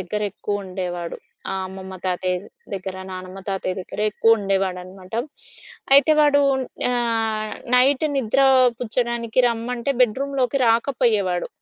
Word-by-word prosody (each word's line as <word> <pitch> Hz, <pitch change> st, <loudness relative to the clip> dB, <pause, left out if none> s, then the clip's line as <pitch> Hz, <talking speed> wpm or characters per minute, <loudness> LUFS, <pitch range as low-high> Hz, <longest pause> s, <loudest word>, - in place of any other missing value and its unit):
దగ్గరెక్కువ 205 Hz, +1 st, -3 dB
ఉండేవాడు. 180 Hz, -2 st, -5 dB, 0.4 s
ఆహ్, 190 Hz, 0 st, -2 dB
అమ్మమ్మ 190 Hz, 0 st, -9 dB
తాతయ్య 180 Hz, 0 st, 0 dB, 0.4 s
దగ్గర, 190 Hz, 0 st, -5 dB, 0.2 s
నానమ్మ, 185 Hz, +1 st, -8 dB
తాతయ్య 190 Hz, -1 st, -2 dB
దగ్గర 185 Hz, -, -7 dB
ఎక్కువ 225 Hz, +2 st, +4 dB
ఉండేవాడనమాట. 190 Hz, -1 st, -3 dB, 0.8 s
అయితే 280 Hz, +2 st, +6 dB
వాడు 290 Hz, -1 st, +5 dB, 0.5 s
ఆహ్, 225 Hz, -3 st, 0 dB, 0.2 s
నైట్ 265 Hz, +3 st, +4 dB
నిద్ర 260 Hz, 0 st, +1 dB, 0.4 s
పుచ్చడానికి 235 Hz, -1 st, -2 dB
రమ్మంటే 235 Hz, +3 st, -2 dB
బెడ్రూమ్‌లోకి 265 Hz, +2 st, 0 dB
రాకపోయేవాడు. 225 Hz, -7 st, +1 dB
215 Hz, 105 wpm, -22 LUFS, 185-245 Hz, 0.8 s, అయితే